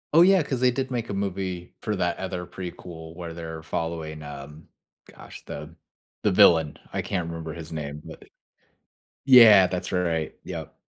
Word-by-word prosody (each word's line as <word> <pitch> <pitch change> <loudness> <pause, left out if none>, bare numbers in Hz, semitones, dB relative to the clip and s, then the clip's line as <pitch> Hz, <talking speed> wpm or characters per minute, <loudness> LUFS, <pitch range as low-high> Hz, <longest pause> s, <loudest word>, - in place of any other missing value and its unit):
Oh, 165 - +8
yeah, 185 -1 +6
'cause 130 -4 -3
they 125 - +5
did 130 +1 -3
make 120 -2 -3
a - - -3
movie 95 -2 -4
for 105 - -2
that 90 -2 -1
other 95 -2 -4
prequel 85 -2 -9
where 85 -1 -7
they're 80 -1 -7
following, 80 -1 -4
um, 75 +1 -10 0.4
gosh, - - -13
the 75 +3 -8 0.5
the - - +2
villain, 80 -3 +5 0.2
I - - -1
can't 90 -3 -3
remember 80 -1 -6
his 80 -1 -9
name, 75 -1 -5
but - - -11 1.0
Yeah, 115 -8 +9
that's 90 0 -4
right, 85 -4 -1
yep. - - -7
85 Hz, 165 wpm, -25 LUFS, 80-100 Hz, 1.0 s, Yeah